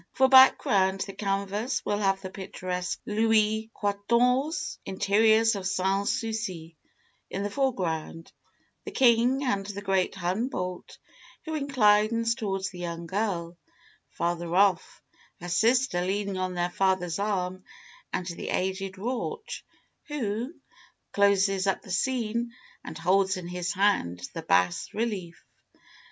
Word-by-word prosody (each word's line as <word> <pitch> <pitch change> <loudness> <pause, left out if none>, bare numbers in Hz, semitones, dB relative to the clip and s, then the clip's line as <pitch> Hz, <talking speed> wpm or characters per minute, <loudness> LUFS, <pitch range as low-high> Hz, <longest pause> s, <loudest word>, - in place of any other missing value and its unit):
For 265 - +4
background 195 -7 +5
the 195 - -4
canvas 200 +5 -2
will 205 0 0
have 195 -1 +1
the 190 -1 -7
picturesque 185 -1 -4
Louis 220 0 +2
Quatorze 240 +9 0
interiors 220 +4 +3
of 190 -2 -3
Sans 195 +1 +1
Souci; 195 -8 -4 0.5
in 195 - -3
the 205 - -3
foreground, 170 - -2 0.5
the - - -6
king 250 +1 +3
and 200 -7 0
the 205 0 -7
great 190 -1 +1
Humboldt, 180 0 -3 0.5
who 315 - -4
inclines 230 -5 +3
towards 195 -5 -3
the 180 - -10
young 170 -1 -5
girl; 175 -3 -2 0.5
farther 170 0 -2
off, 195 -2 +2 0.4
her 175 - -7
sister 230 +1 +2
leaning 200 +1 -2
on 185 -1 -2
their 175 0 -1
father's 185 -2 0
arm, 185 -3 -2 0.5
and 180 - -2
the 170 -1 -6
aged 190 +1 -2
Rauch, 255 - -4 0.4
who 245 -4 -3 0.6
closes 200 -1 +3
up 195 - 0
the 190 - -10
scene 235 +2 -1 0.3
and 160 - -8
holds 190 +3 +2
in 175 -1 -7
his 180 0 -2
hand 90 - +1
the 165 - -5
bas 90 - +1
relief. 205 -7 -3
195 Hz, 125 wpm, -27 LUFS, 180-225 Hz, 0.6 s, background